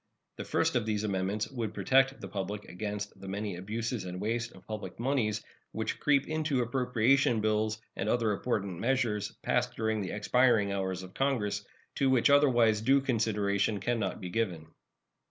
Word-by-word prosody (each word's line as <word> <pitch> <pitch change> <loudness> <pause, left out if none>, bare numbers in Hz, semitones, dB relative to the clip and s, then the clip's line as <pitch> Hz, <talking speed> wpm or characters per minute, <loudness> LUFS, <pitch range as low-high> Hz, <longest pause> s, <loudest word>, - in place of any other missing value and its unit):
The - - -5
first - - +1
of 115 -3 +1
these 105 -1 0
amendments 100 +1 -1
would 115 -5 -4
protect 135 0 +3
the - - -7
public 100 +1 -4
against 105 +2 -5
the 95 - -8
many 100 0 -3
abuses 110 +4 -3
and 90 0 -6
waste 115 +3 -2
of 95 - -16
public 110 0 -6
moneys 115 -5 0 0.3
which 110 0 -3
creep 140 -2 +3
into 155 -5 0
appropriation 125 0 +2
bills 110 0 0 0.2
and 100 - -2
other 115 -2 +2
important 100 -4 -2
measures 115 -5 0
passing - - +1
during 110 -1 0
the 95 - -3
expiring 110 -1 +3
hours 95 -2 -2
of 95 0 -11
Congress, 105 -7 0 0.3
to 135 - +3
which 130 +1 +4
otherwise 120 -7 +4
due 135 +4 +4
consideration 105 -4 +1
can 120 +4 0
not 95 -3 -2
be 90 -3 -6
given. 90 -7 -2
110 Hz, 170 wpm, -30 LUFS, 100-125 Hz, 0.3 s, which